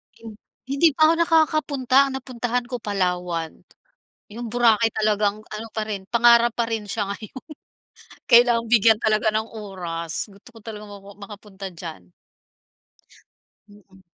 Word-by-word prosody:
Kin 225 -1 -11 0.3
hindi 280 +5 +3
pa 310 - +6
ako 330 - +2
nakakapunta, 310 -5 +2
ang - - -6
napuntahan 245 -1 -3
ko 245 -1 -6
Palawan. 180 -4 -2 0.8
'Yung 235 +1 -6
Boracay 230 -2 +3
talagang 210 -1 0
ano 215 +1 -8
pa 220 - -3
rin 195 -2 -5
pangarap 235 0 +5
pa 235 - +1
rin 220 -2 -3
siya 205 -2 -2
ngayon 220 +5 -10 0.9
Kailangang 235 -1 +5
bigyan 225 -1 +5
talaga 215 -1 +1
ng 215 0 0
oras, 175 -5 -5
gusto 200 +4 -17
ko 225 - -15
talaga 210 -2 -8
ma 200 0 -10 0.2
makapunta 200 -1 -10
diyan. 160 - -10 1.6
Mm. 195 -2 -20
220 Hz, 135 wpm, -23 LUFS, 200-240 Hz, 1.6 s, pa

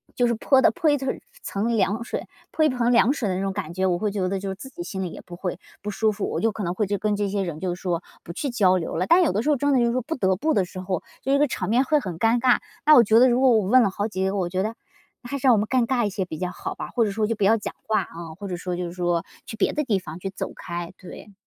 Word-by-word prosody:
就 245 - +2
是 235 - +1
泼 265 +4 +3
得 - - +5
泼 340 -3 +1
一 290 - +3
层 265 -1 -3 0.2
层 205 +4 -2
凉 205 +3 +1
水， - - -5 0.2
泼 315 - +1
一 - - +4
盆 245 -2 +1
凉 240 +1 +5
水 245 -7 -2
的 185 - -1
那 185 - -2
种 195 0 -1
感 185 -5 -5
觉， 185 +2 0
我 175 - +1
会 210 +3 -1
觉 195 -2 -1
得 195 0 -1
就 195 - -5
是 190 - -4
自 265 +8 -10
己 345 +5 -7
心 190 - -4
里 180 - -3
也 - - -9
不 175 - -9
会 180 0 -4 0.2
不 210 - -4
舒 220 +2 +1
服， 205 0 -3
我 - - -2
就 225 - +2
可 210 0 -5
能 175 -1 -1
会 210 - +1
就 205 +1 -1
跟 210 -1 0
这 205 0 -1
些 200 0 -1
人 170 -4 -5
就 180 +1 -2
说 180 -1 -2 0.2
不 - - -8
去 280 - -3
交 190 -6 +3
流 165 - -4
了。 180 +3 0
但 355 +2 +6
有 330 - +2
的 200 +4 0
时 300 - 0
候 295 - +3
真 285 +2 +1
的 260 - +4
就 240 - +3
是 235 - +1
说 255 +1 0
不 325 +6 -3
得 190 -6 +1
不 310 - 0
的 195 -8 +2
时 185 - -9
候， 185 -2 -2 0.2
就 270 - +1
这 280 - +4
个 295 - +4
场 - - -3
面 240 +4 +4
会 300 +3 +2
很 185 - -6
尴 225 +3 +3
尬。 250 0 +4 0.3
那 305 +1 +8
我 245 - +8
觉 220 +1 +4
得 255 - +7
如 245 +1 +2
果 265 - +6
我 215 -5 +3
问 255 +5 +6
了 205 - +2
好 200 +2 -2
几 190 -3 -2
个， 195 - -1
我 180 -2 -1
觉 185 +1 -1
得 220 +2 -3 0.5
还 260 +3 -4
是 270 - 0
让 250 - +8
我 - - +4
们 210 - 0
尴 255 -1 +2
尬 245 -3 +1
一 - - 0
些 190 -1 -3
比 160 -3 -7
较 180 0 -3
好 - - -6
吧， - - -6
或 235 -2 +1
者 205 - -1
说 215 +2 0
就 230 - -1
不 205 - -2
要 220 +4 +5
讲 205 - -5
话 215 -4 +1
嗯， 165 -2 -8
或 200 +3 -7
者 180 - -3
说 180 +1 -4
就 180 0 -3
是 170 - -5
说 175 -2 0 0.2
去 220 - -8
别 205 - +1
的 300 - 0
地 215 -8 +1
方 165 -2 -9
去 195 - -4
走 195 - -5
开， 175 0 -6
对。 200 +3 -12
205 Hz, 365 characters per minute, -24 LUFS, 185-245 Hz, 0.5 s, 那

